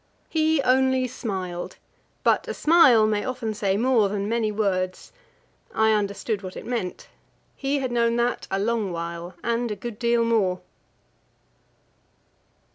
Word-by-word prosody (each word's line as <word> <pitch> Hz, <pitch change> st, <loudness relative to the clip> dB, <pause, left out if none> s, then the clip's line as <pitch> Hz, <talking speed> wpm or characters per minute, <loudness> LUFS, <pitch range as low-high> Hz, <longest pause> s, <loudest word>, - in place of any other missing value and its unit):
He 315 Hz, -2 st, +2 dB
only 260 Hz, 0 st, +3 dB
smiled; 190 Hz, -8 st, -5 dB, 0.5 s
but -, -, +2 dB
a -, -, -4 dB
smile 280 Hz, -9 st, +6 dB
may 210 Hz, -1 st, 0 dB
often 240 Hz, -4 st, -3 dB
say 200 Hz, -2 st, 0 dB
more 230 Hz, -3 st, +3 dB
than 200 Hz, 0 st, -2 dB
many 225 Hz, -1 st, 0 dB
words. 185 Hz, -3 st, -2 dB, 0.6 s
I 220 Hz, 0 st, +4 dB
understood 205 Hz, 0 st, -1 dB
what 185 Hz, -2 st, -8 dB
it -, -, -8 dB
meant; 230 Hz, -7 st, -4 dB, 0.5 s
he 275 Hz, +1 st, -1 dB
had 260 Hz, -3 st, -2 dB
known 235 Hz, -1 st, +2 dB
that 240 Hz, +1 st, -1 dB
a 195 Hz, -, -1 dB
long 215 Hz, -1 st, 0 dB
while 170 Hz, +1 st, -5 dB
and 235 Hz, 0 st, 0 dB
a 210 Hz, -, -3 dB
good 220 Hz, +1 st, -7 dB
deal 235 Hz, -1 st, +2 dB
more. 195 Hz, -6 st, +1 dB
220 Hz, 140 wpm, -24 LUFS, 195-245 Hz, 0.6 s, smile